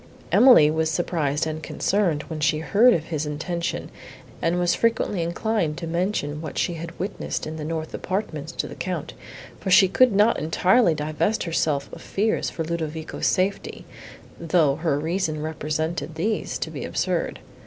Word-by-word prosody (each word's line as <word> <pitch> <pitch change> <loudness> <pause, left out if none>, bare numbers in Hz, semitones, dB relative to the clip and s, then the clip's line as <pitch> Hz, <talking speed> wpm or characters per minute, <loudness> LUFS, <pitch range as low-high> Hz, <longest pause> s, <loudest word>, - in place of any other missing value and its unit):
Emily 245 - +7
was 160 0 0
surprised 160 -3 0
and 155 0 -4
concerned, 170 -3 0
when 160 -2 -6
she 155 0 +2
heard 200 - +4
of 160 - -2
his 155 -2 -3
intention, 170 +3 -3 0.5
and 170 +1 +1
was 175 -1 +2
frequently 225 -5 +1
inclined 170 -1 -1
to 170 - -5
mention 165 -3 -2
what 160 - -7
she 175 - 0
had 165 0 -7
witnessed 195 +4 -4
in 155 +1 -6
the 155 - -5
north 160 0 -4
apartments 165 -6 -3
to - - -3
the - - -9
Count, 185 -1 -4 0.5
for 195 - -4
she 190 +1 +7
could 255 +6 +4
not 210 +3 +3
entirely 180 +4 +3
divest 155 +7 -1
herself 155 -4 0
of - - -9
fears 215 +3 0
for 165 - -4
Ludovico's 160 -1 -3
safety, 190 +2 -1 0.5
though 160 -4 +2
her 160 -3 0
reason 160 0 -1
represented 155 +1 -3
these 210 +7 -1
to - - -4
be - - -6
absurd. - - -1
165 Hz, 165 wpm, -24 LUFS, 155-185 Hz, 0.5 s, Emily